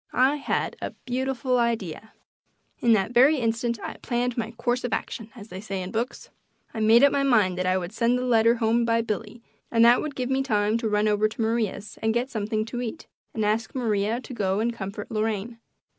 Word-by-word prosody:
I 265 Hz, +4 st, +3 dB
had 280 Hz, -, -2 dB
a -, -, -4 dB
beautiful 255 Hz, 0 st, 0 dB
idea. 220 Hz, -4 st, -2 dB, 0.7 s
In 235 Hz, -1 st, +4 dB
that 205 Hz, 0 st, +1 dB
very 265 Hz, +6 st, +5 dB
instant 230 Hz, -1 st, -1 dB
I -, -, -6 dB
"planned 245 Hz, 0 st, -1 dB
my 225 Hz, -2 st, -2 dB
course 240 Hz, +1 st, -1 dB
of 245 Hz, -, -2 dB
action," 225 Hz, -1 st, -4 dB
as 220 Hz, -2 st, -11 dB
they 185 Hz, +1 st, -7 dB
say 195 Hz, -2 st, -4 dB
in 180 Hz, -, -6 dB
books. 235 Hz, +3 st, -4 dB, 0.4 s
I 225 Hz, -, -4 dB
made 225 Hz, +3 st, +5 dB
up 280 Hz, -, +7 dB
my 280 Hz, -, +1 dB
mind 220 Hz, -9 st, +3 dB
that 185 Hz, -, 0 dB
I 185 Hz, 0 st, +2 dB
would 175 Hz, 0 st, -4 dB
send 235 Hz, +2 st, +2 dB
the 250 Hz, -, -2 dB
letter 230 Hz, -1 st, +4 dB
home 230 Hz, +1 st, +2 dB
by 230 Hz, 0 st, +2 dB
Billy, 225 Hz, +1 st, -5 dB, 0.3 s
and 230 Hz, 0 st, +4 dB
that 240 Hz, +1 st, +6 dB
would 305 Hz, -2 st, -5 dB
give 255 Hz, 0 st, -2 dB
me 265 Hz, 0 st, +2 dB
time 215 Hz, -3 st, +1 dB
to 225 Hz, -2 st, -1 dB
run 210 Hz, 0 st, +2 dB
over 210 Hz, 0 st, +3 dB
to 215 Hz, -, -6 dB
Maria's 220 Hz, -2 st, -2 dB
and 220 Hz, +1 st, +1 dB
get 250 Hz, +3 st, -1 dB
something 215 Hz, 0 st, -1 dB
to 240 Hz, +2 st, -5 dB
eat 230 Hz, -3 st, -5 dB, 0.3 s
and 220 Hz, -2 st, 0 dB
ask 220 Hz, +5 st, -1 dB
Maria 220 Hz, -2 st, 0 dB
to 255 Hz, -, -9 dB
go 195 Hz, -3 st, 0 dB
and 235 Hz, +2 st, 0 dB
comfort 200 Hz, 0 st, -6 dB
Lorraine. 220 Hz, +1 st, -2 dB
230 Hz, 220 wpm, -25 LUFS, 215-245 Hz, 0.7 s, up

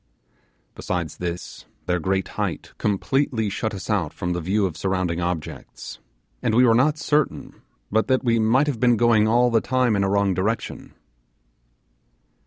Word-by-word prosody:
Besides 85 Hz, -4 st, -4 dB
this, 85 Hz, 0 st, -6 dB, 0.2 s
their 90 Hz, 0 st, 0 dB
great 95 Hz, +2 st, -1 dB
height -, -, -4 dB
completely 110 Hz, +1 st, 0 dB
shut 110 Hz, +1 st, -3 dB
us 95 Hz, -, -7 dB
out 100 Hz, -8 st, -1 dB
from 90 Hz, 0 st, -3 dB
the 90 Hz, -, -3 dB
view 100 Hz, +5 st, +1 dB
of 90 Hz, -5 st, -3 dB
surrounding 90 Hz, 0 st, -1 dB
objects, 85 Hz, -2 st, -5 dB, 0.4 s
and 110 Hz, -, 0 dB
we 125 Hz, +2 st, +6 dB
were 115 Hz, -, +5 dB
not 145 Hz, +6 st, +3 dB
certain 150 Hz, -2 st, -1 dB, 0.3 s
but 110 Hz, +2 st, +1 dB
that 130 Hz, -1 st, +2 dB
we 115 Hz, -2 st, +2 dB
might 115 Hz, +6 st, +3 dB
have 140 Hz, -6 st, -2 dB
been 120 Hz, -2 st, +3 dB
going 115 Hz, -2 st, +4 dB
all 120 Hz, +2 st, +3 dB
the 115 Hz, -1 st, +3 dB
time 125 Hz, -3 st, +1 dB
in 100 Hz, -, +1 dB
a 95 Hz, -, +1 dB
wrong 100 Hz, -1 st, +2 dB
direction. 105 Hz, +6 st, -3 dB
105 Hz, 165 wpm, -23 LUFS, 90-120 Hz, 0.4 s, we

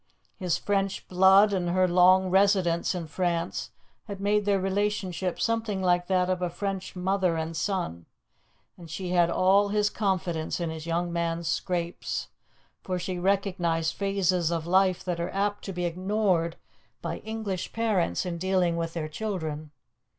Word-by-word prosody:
His 180 Hz, -4 st, -1 dB
French 195 Hz, -1 st, -1 dB
blood 190 Hz, +3 st, +6 dB
and 180 Hz, -2 st, 0 dB
her 185 Hz, +1 st, +3 dB
long 185 Hz, +1 st, +5 dB
residence 190 Hz, -3 st, +3 dB
in 175 Hz, -2 st, -4 dB
France 170 Hz, +1 st, -2 dB, 0.4 s
had 200 Hz, -2 st, -7 dB
made 205 Hz, +1 st, +1 dB
their 200 Hz, -1 st, +2 dB
relationship 190 Hz, -2 st, -1 dB
something 225 Hz, -3 st, 0 dB
like 175 Hz, -1 st, +2 dB
that 185 Hz, -1 st, +2 dB
of 185 Hz, -1 st, -1 dB
a 180 Hz, -, 0 dB
French 195 Hz, +2 st, -4 dB
mother 185 Hz, -2 st, +1 dB
and 160 Hz, +1 st, -3 dB
son, 160 Hz, -, -2 dB, 0.7 s
and 170 Hz, -2 st, -11 dB
she 180 Hz, +3 st, -5 dB
had 175 Hz, -1 st, +3 dB
all 195 Hz, +3 st, +3 dB
his 210 Hz, 0 st, +1 dB
confidence 180 Hz, -6 st, -1 dB
in 170 Hz, -2 st, -2 dB
his 160 Hz, 0 st, -7 dB
young 170 Hz, +1 st, -1 dB
man's 170 Hz, 0 st, -1 dB
scrapes, 175 Hz, 0 st, -2 dB, 0.5 s
for 185 Hz, -1 st, -3 dB
she 180 Hz, 0 st, -4 dB
recognized 180 Hz, -4 st, 0 dB
phases 190 Hz, -4 st, +1 dB
of 165 Hz, -2 st, -2 dB
life 185 Hz, +1 st, +3 dB
that 175 Hz, -2 st, -3 dB
are 170 Hz, -, -2 dB
apt 205 Hz, +1 st, -1 dB
to 195 Hz, -, -4 dB
be 180 Hz, -1 st, -3 dB
ignored 180 Hz, -1 st, 0 dB, 0.5 s
by -, -, -3 dB
English 215 Hz, -5 st, -4 dB
parents 215 Hz, -6 st, 0 dB
in 170 Hz, -2 st, -4 dB
dealing 185 Hz, -2 st, +1 dB
with 165 Hz, 0 st, -3 dB
their 160 Hz, -2 st, -3 dB
children. 155 Hz, -4 st, -4 dB
185 Hz, 160 wpm, -27 LUFS, 170-195 Hz, 0.7 s, blood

